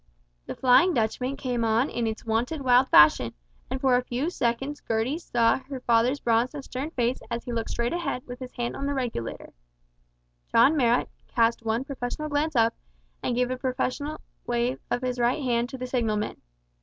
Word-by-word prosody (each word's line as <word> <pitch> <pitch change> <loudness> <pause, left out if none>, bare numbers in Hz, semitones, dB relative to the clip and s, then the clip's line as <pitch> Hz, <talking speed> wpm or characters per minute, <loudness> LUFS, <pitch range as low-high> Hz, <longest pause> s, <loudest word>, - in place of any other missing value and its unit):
The - - -5
"Flying 275 +8 +5
Dutchman" 250 +4 -1
came 245 -3 -2
on 225 +4 +2
in 235 -5 -2
its 220 0 -5
wonted 235 +7 -1
wild 255 +1 +4
fashion, 150 -6 +6 0.3
and 265 - -3
for 260 -2 +3
a 250 - +2
few 255 +8 -2
seconds 270 +2 -2
Gertie 230 +8 0
saw 235 -7 +2
her 265 0 -7
father's 245 +3 +2
bronzed 235 +4 +1
and 285 - -6
stern 265 +3 -5
face 250 -4 -1
as 235 -1 -3
he 245 - -5
looked 230 -1 -2
straight 235 +3 -1
ahead 310 -7 -3
with 245 0 -8
his 255 -1 -7
hand 240 -1 -3
on 280 - -3
the 285 - -1
regulator. 235 - -4 1.0
John 265 +7 +5
Marrot 245 -4 +2 0.2
cast 230 0 +1
one 225 +2 0
professional 275 +2 -4
glance 295 +1 0
up, 230 -1 +4 0.5
and 245 - -1
gave 250 +1 +1
a 255 - -2
professional 265 +4 -2 0.3
wave 240 +1 0
of 245 - -1
his 250 -1 -2
right 245 +5 +1
hand 240 -1 0
to 265 - -7
the 255 - -4
signalman. 225 -4 -1
250 Hz, 190 wpm, -26 LUFS, 235-270 Hz, 1.0 s, fashion